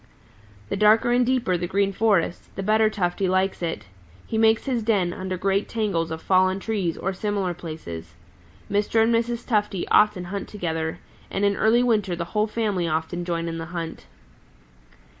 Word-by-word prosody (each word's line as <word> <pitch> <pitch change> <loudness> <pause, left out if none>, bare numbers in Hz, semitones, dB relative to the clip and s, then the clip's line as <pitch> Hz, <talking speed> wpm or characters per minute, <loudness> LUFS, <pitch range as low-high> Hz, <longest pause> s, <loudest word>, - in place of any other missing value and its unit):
"The - - -1
darker 215 +3 +4
and 245 +1 +4
deeper 245 -7 +1
the 175 - -3
Green 195 +2 +1
Forest, 195 -5 0
the 195 - -4
better 215 +2 +3
Tufty 190 -2 -1
likes 185 +1 +1
it. 165 -1 -3 0.4
He - - -5
makes 220 0 +3
his 255 -4 0
den 200 -6 +1
under 185 0 -4
great 195 +2 0
tangles 200 -8 -1
of 160 0 -6
fallen 185 0 +3
trees 195 -6 -2
or 195 - -2
similar 195 -2 -1
places. 85 - -8 0.5
Mr. 210 +2 +2
And 230 +1 +2
Mrs. 235 +1 0
Tufty 210 -5 0
often 210 -4 +4
hunt 195 +3 -5
together, 160 -5 -3 0.3
and 200 +1 0
in 200 0 +2
early 230 +4 +3
winter 210 -7 +1
the 170 0 -4
whole 210 +1 +2
family 210 -5 -1
often 160 +2 -2
join 170 -1 -2
in 165 0 -4
the 165 - -4
hunt. 165 -1 -6
195 Hz, 175 wpm, -24 LUFS, 175-215 Hz, 0.5 s, darker